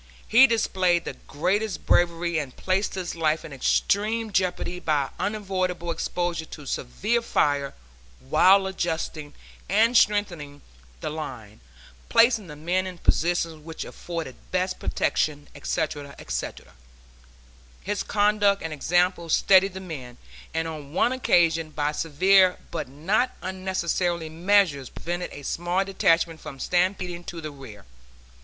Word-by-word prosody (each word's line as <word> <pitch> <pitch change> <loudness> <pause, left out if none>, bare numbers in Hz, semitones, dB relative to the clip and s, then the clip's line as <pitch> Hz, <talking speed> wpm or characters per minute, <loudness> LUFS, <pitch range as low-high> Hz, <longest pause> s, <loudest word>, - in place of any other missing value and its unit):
He 255 +5 +7
displayed 185 -7 +1
the - - -4
greatest 195 +7 -1
bravery 170 -1 +2
and 140 -4 -6
placed 190 +2 0
his 185 -2 -4
life 160 -1 0
in 155 - -9
extreme 215 - +1
jeopardy 180 -1 -1
by 150 -5 0
unavoidable 185 -4 -2
exposure 170 0 -2
to 150 -2 -10
severe 210 - -1
fire 145 -10 0 0.4
while 190 - +5
adjusting 160 -5 -3 0.3
and 225 +5 +3
strengthening 175 -10 +1 0.4
the - - -3
line, 125 -9 -7 0.5
placing 230 -3 +4
the 150 - -9
men 180 +5 -1
in 180 -1 -7
positions 165 -2 0
which 165 0 -6
afforded 165 -7 -6
best 185 0 -1
protection, 145 -1 -1
etc., 145 -3 -3
etc. 60 -4 -5 1.1
His 205 0 -2
conduct 205 -1 +2
and 165 -1 -4
example 175 +3 +1
steadied 190 +3 +4
the - - -4
men, 140 -10 -8 0.3
and 160 0 -1
on 150 -3 -8
one 240 - +3
occasion 165 -10 +2
by 150 -1 -1
severe 185 +5 +4
but 160 -5 -3
not 195 - 0
unnecessary 180 -3 -1
measures 170 -5 +2
prevented 175 +1 -4
a 145 - -9
small 175 +6 -1
detachment 165 -4 +1
from 135 - -9
stampeding 180 0 0
to 170 - -6
the 155 -2 -6
rear. 125 -8 -12
175 Hz, 130 wpm, -25 LUFS, 155-190 Hz, 1.1 s, He